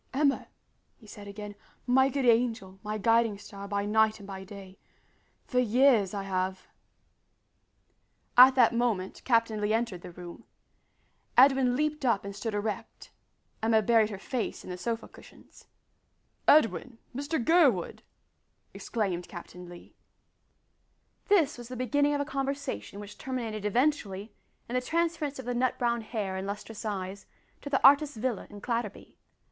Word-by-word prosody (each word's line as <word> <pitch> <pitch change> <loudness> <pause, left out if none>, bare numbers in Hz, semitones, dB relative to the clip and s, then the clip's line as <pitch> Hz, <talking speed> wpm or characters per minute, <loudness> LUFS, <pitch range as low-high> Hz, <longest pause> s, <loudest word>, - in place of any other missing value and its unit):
"Emma," 280 -1 +1 0.5
he 225 - -19
said 205 -1 -11
again, 205 0 -8 0.3
"my 265 +2 +4
good 275 0 -1
angel, 225 -5 +1
my 210 0 -4
guiding 225 0 +2
star 200 -1 -10
by 200 0 -1
night 220 +1 +2
and 200 - -11
by 190 -1 -7
day 195 -1 -12 0.7
for 250 - 0
years 240 -4 +4
I 200 -1 -4
have 185 -1 -3 0.9
" - - -45
At 265 - -3
that 245 -3 +5
moment 230 -6 -1
Captain 230 -3 +2
Lee 210 +1 +1
entered 225 -6 -1
the - - -9
room. 175 0 -11 0.9
Edwin 260 -1 +5
leaped 300 +1 -1
up 230 -6 +1
and 200 0 -6
stood 220 +1 -4
erect. 205 0 -5 0.5
Emma 220 0 +3
buried 225 0 +4
her 205 - -6
face 240 +4 -4
in - - -8
the - - -4
sofa 230 +2 -3
cushions. - - -17 0.8
"Edwin 260 -4 +3 0.2
Mr 285 +4 -2
Gurwood!" 270 - +2 0.7
exclaimed 190 -6 -3
Captain 180 0 -10
Lee. 175 0 -13 1.3
This 325 - +3
was 240 - -9
the 255 - -7
beginning 285 +4 +1
of 285 - 0
a - - -2
conversation 275 -6 -4
which 205 0 -10
terminated 230 -5 -4
eventually 210 -4 0 0.3
in 240 - -7
the 250 - +1
transference 325 0 -1
of 260 - -8
the 245 - -2
nut 250 +1 0
brown 235 -1 0
hair 210 -4 -4
and 190 +1 -4
lustrous 210 +2 -7
eyes 195 -1 -5 0.3
to 285 - -7
the 270 -1 +6
artist's 285 -1 +4
villa 235 -2 -2
in 205 -1 -11
Clatterby. 230 -3 -4
225 Hz, 150 wpm, -29 LUFS, 200-260 Hz, 1.3 s, the